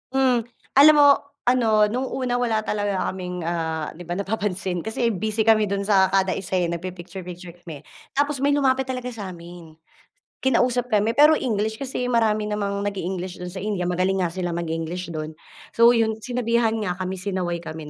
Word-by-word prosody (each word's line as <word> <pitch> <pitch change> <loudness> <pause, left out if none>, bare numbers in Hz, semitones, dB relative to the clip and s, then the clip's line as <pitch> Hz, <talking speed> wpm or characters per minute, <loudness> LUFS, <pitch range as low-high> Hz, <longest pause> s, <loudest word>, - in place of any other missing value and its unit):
Hmm. 260 -3 +2 0.3
Alam 290 +3 +9
mo, 290 - +8 0.4
ano, 225 -4 +4
nung 245 +5 -2
una 250 -2 -1
wala 235 -3 +1
talaga 205 -2 -1
kaming, 180 -1 -5
ah, 160 -2 -3
'di 175 - -9
ba 175 +2 -4
napapansin, 195 -3 -2
kasi 220 +2 -1
busy 220 +1 -1
kami 220 -1 +5
do'n 200 0 -2
sa 190 -2 +4
kada 190 -1 +2
isa 190 -1 -2
eh, 175 - +1
nag 170 0 -4
pi-picture-picture 180 -1 -8
kami. 160 -4 -8 0.3
Tapos 285 -1 0
may 285 - +3
lumapit 265 -2 +2
talaga 250 -1 -5
sa'min. 175 -7 -9 0.6
Kinausap 245 -1 +1
kami, 215 +2 +2
pero 300 +2 +7
English, 220 -5 -1
kasi 255 -2 -3
marami 225 -3 +1
namang 200 -1 -2
nag 205 - -1
e-English 185 -1 -5
do'n 180 - -5
sa 185 - -9
India 195 -3 -2
magaling 185 +2 0
nga 175 - +1
sila 175 0 -3
mag-English 170 +1 -4
do'n, 155 -1 -5 0.4
so 230 0 +6
yun 225 -2 +3
sinabihan 235 -1 0
nga 205 -5 -2
kami 185 +1 -4
sinaway 185 -2 -2
kami 160 -2 -8
200 Hz, 180 wpm, -23 LUFS, 180-235 Hz, 0.6 s, Alam